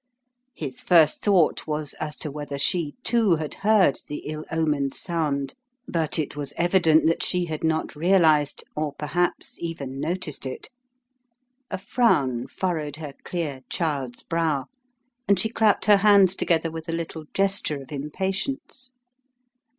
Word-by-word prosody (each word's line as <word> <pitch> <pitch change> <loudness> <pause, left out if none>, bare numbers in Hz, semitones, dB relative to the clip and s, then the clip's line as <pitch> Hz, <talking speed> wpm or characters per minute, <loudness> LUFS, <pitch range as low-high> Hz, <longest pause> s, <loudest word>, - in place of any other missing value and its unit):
His 135 -5 -6
first 165 -4 +4
thought 185 -7 +2
was 150 -2 -2
as 150 -1 -4
to 150 - -3
whether 145 -1 -5
she, 160 +1 +1
too, 225 -6 +3
had 155 -2 -4
heard 205 -7 +4
the 150 - -6
ill 155 +1 -5
omened 150 -4 0
sound, 150 -6 -1 0.3
but 165 - -1
it 155 -3 -2
was 145 -1 -5
evident 175 -3 +4
that 165 +1 +2
she 180 -1 +1
had 155 -2 -5
not 160 -1 0
realized, 160 -3 +3
or 150 -1 -2
perhaps 175 +4 -2
even 140 -6 -5
noticed 160 -4 -3
it. 130 - -7 1.0
A - - -3
frown 140 - +1
furrowed 155 -6 -2
her 150 -2 -7
clear, 150 -7 -3
child's 140 -8 -2
brow 160 -5 0 0.6
and 200 0 +4
she 220 - +2
clapped 220 -3 +2
her 210 -1 +7
hands 195 -2 +5
together 165 -3 +1
with 160 +1 -7
a - - -1
little 165 -1 -4
gesture 195 -7 +1
of 135 - -12
impatience. 195 - -3
160 Hz, 145 wpm, -25 LUFS, 150-185 Hz, 1.0 s, her